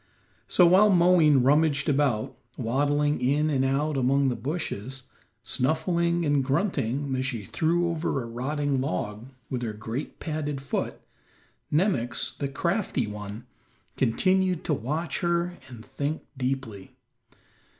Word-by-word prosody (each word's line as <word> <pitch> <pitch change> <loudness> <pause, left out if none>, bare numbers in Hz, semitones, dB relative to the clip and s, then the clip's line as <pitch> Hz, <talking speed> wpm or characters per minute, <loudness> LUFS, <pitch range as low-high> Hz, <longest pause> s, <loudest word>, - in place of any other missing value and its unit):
So 180 - +5
while 190 +5 +6
Moween 170 -7 +5
rummaged 145 +1 +3
about, 135 -6 +1 0.2
waddling 145 +5 +1
in 150 +4 +2
and 135 -2 +1
out 140 +2 0
among 135 +1 +3
the 125 - -1
bushes, 135 - -4 0.4
snuffing 170 +7 +1
and 145 -2 +2
grunting 135 - 0
as 130 - -1
she 120 -5 -3
threw 170 - +1
over 160 -5 -1
a - - -7
rotting 135 +3 -1
log 105 0 -3 0.2
with 125 -2 -2
her 115 -3 -3
great, 110 +6 -6
padded 150 -3 -3
foot, 135 0 -3 0.7
Nemox, 150 - 0
the 140 - -2
crafty 170 - -1
one, 105 +2 -7 0.5
continued 185 +8 +2
to 155 - 0
watch 150 +6 -2
her 175 0 -1
and 115 -3 -11
think 140 +3 -3
deeply. 125 -7 -4
140 Hz, 130 wpm, -26 LUFS, 125-160 Hz, 0.7 s, while